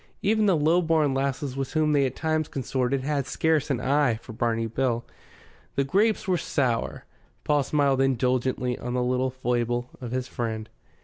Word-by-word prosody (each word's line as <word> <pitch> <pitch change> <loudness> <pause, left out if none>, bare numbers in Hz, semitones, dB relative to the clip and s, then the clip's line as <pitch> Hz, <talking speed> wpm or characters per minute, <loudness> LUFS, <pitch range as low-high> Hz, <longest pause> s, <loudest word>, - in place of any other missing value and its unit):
Even 215 +1 +3
the 185 -4 +4
low 160 +4 +3
born 160 -4 +2
lasses 135 0 -2
with 135 -1 -3
whom 155 -1 +2
they 140 -2 +3
at 130 - -7
times 155 -1 0
consorted 130 0 -1
had 140 -2 -1
scarce 160 +2 +1
an 135 -4 0
eye 135 -1 +2
for 115 +1 -10
Barney 115 0 0
Bill. 120 +1 -1 0.7
The 140 - +2
grapes 200 +10 +1
were 180 -2 +2
sour. 125 -7 -1 0.4
Paul 150 -1 +2
smiled 140 -1 +2
indulgently 125 -1 0
on 125 +1 -4
the 125 - +1
little 130 +1 +1
foible 120 -1 -1
of 125 - -5
his 130 +1 -2
friend. 110 -2 -4
135 Hz, 175 wpm, -26 LUFS, 125-150 Hz, 0.7 s, the